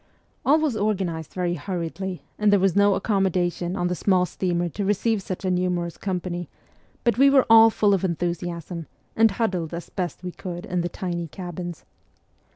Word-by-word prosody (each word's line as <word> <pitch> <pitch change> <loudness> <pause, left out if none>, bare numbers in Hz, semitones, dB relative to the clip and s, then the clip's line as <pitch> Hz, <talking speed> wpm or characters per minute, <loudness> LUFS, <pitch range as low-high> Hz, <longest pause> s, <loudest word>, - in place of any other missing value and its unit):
All 290 +3 +5
was 305 -6 0
organized 190 -7 -1
very 180 -2 -1
hurriedly, 175 0 -4 0.2
and 210 -1 +4
there 205 - +5
was 190 -2 +2
no 200 -1 +5
accommodation 185 -3 0
on 175 - -1
the 180 - 0
small 185 0 +2
steamer 175 -1 -1
to 200 - -4
receive 205 +2 +1
such 190 0 -5
a 185 - +1
numerous 180 -2 -1
company; 180 -2 -4 0.5
but 235 -1 +1
we 275 +1 +7
were 275 -2 +5
all 225 0 +9
full 210 -2 +2
of 195 - +1
enthusiasm, 170 -1 -3 0.3
and 225 0 +5
huddled 185 -6 -2
as 170 - -8
best 180 -2 -4
we 180 - -4
could 175 0 -7
in 180 -2 -1
the 175 - -2
tiny 175 -2 -4
cabins. 175 0 -7
180 Hz, 175 wpm, -24 LUFS, 175-200 Hz, 0.5 s, all